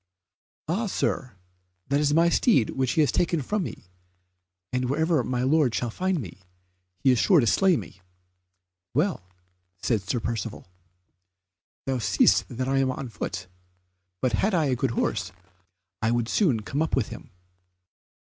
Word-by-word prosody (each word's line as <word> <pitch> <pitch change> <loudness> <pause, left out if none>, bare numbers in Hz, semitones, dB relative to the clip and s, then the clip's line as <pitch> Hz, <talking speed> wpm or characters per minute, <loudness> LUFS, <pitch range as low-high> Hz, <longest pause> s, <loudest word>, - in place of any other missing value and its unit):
"Ah, 200 +8 0
Sir, 130 - -2 0.5
that 140 +1 +2
is 145 -1 +2
my 165 +3 +4
steed 170 - +3
which 130 -2 0
he 160 - +3
has 150 - +3
taken 170 -1 +1
from 210 +8 -1
me, 165 - -6 0.9
and 125 0 0
wherever 160 0 +2
my 125 +1 -1
lord 135 -3 +3
shall 120 0 -1
find 185 +5 -1
me, 95 - -8 0.6
he 130 +8 +3
is 125 - +2
sure 185 -5 +5
to 125 - +3
slay 185 - +4
me." 95 -2 -9 0.9
"Well," 160 - +1 0.6
said 110 +3 0
Sir 100 +6 -2
Percivale, 115 -3 -4 1.2
"thou 130 -1 -1
seest 110 - +3
that 130 +2 -3
I 135 0 +2
am 135 -1 +2
on 130 0 -4
foot, 90 -4 -5 0.8
but 130 - +2
had 200 -1 +1
I 160 -3 +2
a 130 - +2
good 130 +2 0
horse - - -1 0.7
I 110 - +2
would 120 -1 +1
soon 145 - +2
come 135 +8 -3
up 160 - +1
with 125 -5 0
him." - - -10
130 Hz, 160 wpm, -26 LUFS, 115-160 Hz, 1.2 s, sure